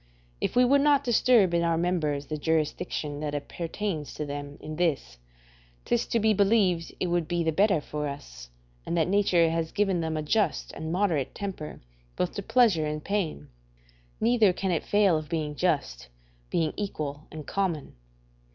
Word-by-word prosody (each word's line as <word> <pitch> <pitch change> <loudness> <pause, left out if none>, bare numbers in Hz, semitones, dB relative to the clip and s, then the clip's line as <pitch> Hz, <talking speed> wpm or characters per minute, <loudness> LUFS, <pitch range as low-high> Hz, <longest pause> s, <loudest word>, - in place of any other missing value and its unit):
If - - -1
we 250 0 +6
would 280 +3 +4
not 285 -1 +4
disturb 235 -6 +4
in 170 - +3
our 165 -1 +1
members 160 -5 0
the 155 - -4
jurisdiction 155 -1 -1
that 150 -1 -3
appertains 165 +2 -4
to 150 - -3
them 145 0 -6
in 155 0 -7
this, 140 - -1 0.7
'tis 240 - 0
to 230 - +1
be 220 0 +3
believed 195 -4 +2
it - - 0
would 175 -2 0
be 175 -1 0
the 160 - +1
better 195 +1 +3
for 150 0 -4
us, - - -9 0.3
and 170 - -2
that 160 - +2
nature 180 -4 +3
has 165 -1 -1
given 195 -4 +1
them 160 -1 -2
a 155 - -2
just 210 +8 0
and 160 0 -5
moderate 175 -7 0
temper 190 -7 -6 0.3
both 180 - -1
to 200 - -4
pleasure 200 -8 +3
and 150 0 -4
pain; 180 - -2 0.7
neither 225 -3 +4
can 190 +1 -2
it 165 - 0
fail 205 -4 +3
of 155 -1 -10
being 155 -3 -2
just, 140 - -1 0.4
being 160 -2 0
equal 155 -8 -4
and 155 -2 -8
common. 180 -7 -2
170 Hz, 175 wpm, -27 LUFS, 150-200 Hz, 0.7 s, we